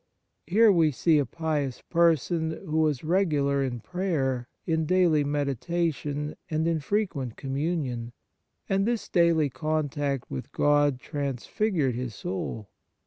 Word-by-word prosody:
Here 215 +5 +6
we 165 -4 +4
see 155 +2 +3
a 140 - 0
pious 150 -4 -2
person 165 -1 +2
who 155 +1 0
was 155 -4 +1
regular 150 -6 +2
in 120 -3 -3
prayer, 135 - -1 0.2
in 160 -2 0
daily 175 -4 +4
meditation 145 +1 -1 0.2
and 160 0 0
in 165 -1 +1
frequent 150 - -2
Communion, 135 -4 -2 0.6
and 195 +2 +1
this 235 -2 -1
daily 165 -5 +3
contact 145 -3 -2
with 65 - -5
God 145 -2 +3
transfigured 145 - -1
his 120 -2 -4
soul. 160 - -5
155 Hz, 125 wpm, -27 LUFS, 135-170 Hz, 0.6 s, Here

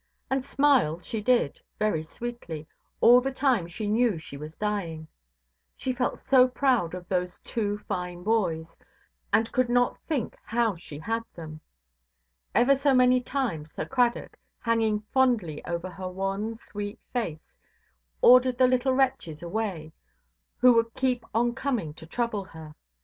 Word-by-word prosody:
And 265 -1 +1
smile 270 - +3
she 215 +5 -4
did, 235 - +1 0.2
very 210 -7 +1
sweetly, 165 -3 -7 0.4
all 245 +2 +8
the 270 +2 -2
time 260 -9 +1
she 190 +5 -5
knew 220 -2 +2
she 155 -3 -9
was 150 +3 -9
dying; 175 -7 -3 0.7
she 260 - -2
felt 250 0 -1
so 255 -2 +5
proud 250 -9 +1
of 180 -1 -9
those 180 -1 -1
two 205 -3 -2
fine 180 -2 -4
boys, 180 -7 0 0.6
and 225 +1 +2
could 255 -1 +1
not 245 0 +2
think 285 -9 -2
how 230 -3 0
she 160 -3 -10
had 225 +9 -2
them. 155 -2 -9 0.9
Ever 245 +4 +5
so 275 0 +2
many 250 0 +5
times 225 - -3
Sir - - -3
Cradock, 245 -2 0 0.2
hanging 225 -2 +1
fondly 235 - +2
over 175 +1 -4
her 185 0 -6
wan, 195 +4 -3
sweet 205 -2 -7 0.2
face, 170 -11 -4 0.7
ordered 250 0 +7
the 255 - +5
little 255 +1 +2
wretches 255 - 0
away, 175 -4 -3 0.6
who 250 -1 +6
would 230 0 +1
keep 255 -2 0
on 235 +2 +1
coming 240 - -2
to 160 - -12
trouble 225 +1 -2
her. 160 -3 -11
220 Hz, 150 wpm, -27 LUFS, 175-250 Hz, 0.9 s, all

